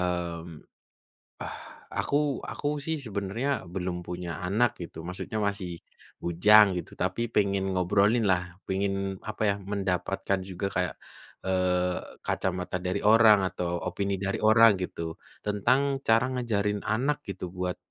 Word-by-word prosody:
mmm, 85 -2 -3 0.8
ah - - -5 0.4
aku, 140 - +1 0.3
aku - - -5 0.2
sih 160 0 0
sebenarnya 100 +5 -2 0.3
belum 90 -1 -2
punya 90 0 -5 0.2
anak 110 +5 +3
gitu, 85 - -9
maksudnya 90 +4 -4
masih 100 -3 -4 0.5
bujang 105 +5 +7
gitu, - - -7
tapi 95 +4 -1
pengen 100 -2 +2
ngobrolin 100 +5 +3
lah, 90 -1 +4 0.3
pengin 95 +1 0 0.4
apa 110 - -5
ya, - - +1 0.2
mendapatkan 95 0 -1
juga 95 +1 -3
kayak, 90 -2 0 0.5
eee, 90 -1 +1 0.3
kacamata 90 -1 -1
dari 90 - 0
orang 110 0 +7
atau 90 -1 -3 0.2
opini 100 +2 -1
dari 100 - -1
orang 115 +1 +8
gitu. 90 - -4 0.4
Tentang 105 +6 +3 0.3
cara 115 +2 +5
ngajarin 105 -5 0
anak 135 +7 0
gitu 95 -1 -5
buat, 90 0 -2
100 Hz, 130 wpm, -28 LUFS, 90-105 Hz, 0.8 s, orang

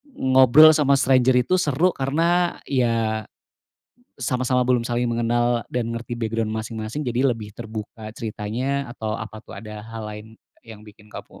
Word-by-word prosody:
ngobrol 130 +4 +7
sama 140 -2 +3
stranger 130 -1 +3
itu 185 - +1
seru, 160 +3 +2
karena, 170 +5 0
iya, 115 -4 0 0.9
sama-sama 125 -1 0
belum 125 -2 +2
saling 120 0 -1
mengenal 120 0 0
dan 120 -2 -1
ngerti 115 +1 -5
background 110 -1 -2
masing-masing, 110 +3 -5
jadi 125 0 +1
lebih 110 -3 -8
terbuka 110 -1 -8
ceritanya, 120 +5 -3
atau 110 -2 -4
apa 110 -1 -8
tuh? - - -12
Ada 105 -1 -8
hal 115 -1 -7
lain 105 0 -8 0.4
yang 110 -2 -13
bikin 105 0 -17
kamu - - -11
120 Hz, 145 wpm, -23 LUFS, 110-130 Hz, 0.9 s, ngobrol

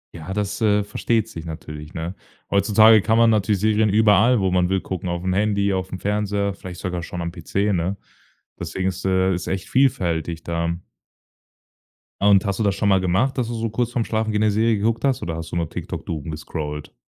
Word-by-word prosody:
Ja, 80 +2 -7
das, 105 +1 -2
äh, 105 -2 +3
versteht 110 +2 -1
sich 85 -7 -8
natürlich, 75 0 -8
ne? 85 +2 -4 0.4
Heutzutage 110 +2 +6
kann 110 +3 +2
man 115 -1 +5
natürlich 105 -1 +1
Serien 110 0 +3
überall, 110 +3 +4
wo 95 -2 +1
man 90 -1 +2
will, 95 0 +1
gucken, 90 -1 -5
aufm 85 +2 -2
Handy, 100 0 +1
aufm 95 0 -3
Fernseher, 100 -1 -1
vielleicht 90 -2 -9
sogar 90 -2 -3
schon 85 +1 -6
am 85 - -3
PC, 100 +4 -1
ne? 90 +2 -1 0.6
Deswegen 95 0 -2
ist, 95 - -7
äh 95 0 +2
ist 90 0 -4
echt 95 0 -3
vielfältig 85 - +1
da. 85 0 -2 1.4
Ah, 100 - +4
und 100 -1 +5
hast 100 -1 -2
du - - +1
das 100 -2 +1
schon 105 - +1
mal 95 -1 +4
gemacht, 95 +10 +1
dass 125 - 0
du 120 - -4
so 115 0 -2
kurz 120 +2 -1
vorm 120 -2 -1
Schlafengehen 110 -1 -1
'ne 110 - +3
Serie 110 +1 +2
geguckt 115 +2 0
hast, 135 -2 +1
oder 80 -1 -3
hast 80 0 -7
du - - -4
nur 85 -1 0
noch - - -14
TikTok - - -6
doomgescrollt? 75 -1 -5
100 Hz, 205 wpm, -22 LUFS, 85-110 Hz, 1.4 s, Heutzutage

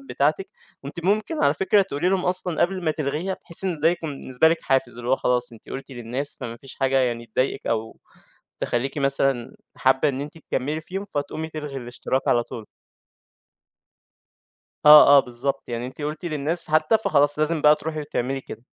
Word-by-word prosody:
بتاعتِك 155 - -1 0.4
وأنتِ 155 +5 -7
مُمكن 215 - +1
على 140 - +3
فكرة 200 +3 +3
تقولي 175 -2 -2
لهم 190 -1 +1
أصلًا 180 -2 0
قبل 185 0 -1
ما 160 - +2
تلغيها 155 +5 -2
بحيث 170 +3 -4
إن 175 -5 -2
ده 160 - +4
يكون 165 -2 -2
بالنسبة 130 +5 +2
لِك 165 0 0
حافز، 135 -3 0
اللي 120 +1 -4
هو 130 - +4
خلاص، 125 -1 0
أنتِ 115 - -16
قُلتِ 135 +1 -7
للناس 125 +4 -5
فما 115 -2 -6
فيش 135 +2 -13
حاجة 135 0 +1
يعني 120 -2 -1
تضايقك، 130 +4 -2
أو 110 0 -2 0.6
تخلّيكِ 135 +5 -2
مثلًا 135 -3 0 0.2
حابة 130 +3 +3
إن 135 0 -5
أنتِ 150 +3 -7
تكملّي 150 0 -3
فيهم، 190 +4 -6
فتقومي 155 -3 -4
تلغي 150 -3 -6
الاشتراك 125 +1 -3
على 120 - +3
طول. 110 -2 -9 2.2
آه، 150 0 +10
آه - - +9
بالضبط 135 +2 -4
يعني 120 0 -3
أنتِ 130 - -11
قُلتِ 150 +4 -4
للناس 155 +1 +1
حتى، 155 +8 +3
فخلاص 145 -7 +2
لازم 155 +1 +1
بقى 150 +1 +6
تروحي، 155 0 -5
وتعملي 135 -2 -3
كده. 115 -2 -10
145 Hz, 180 wpm, -23 LUFS, 130-160 Hz, 2.2 s, آه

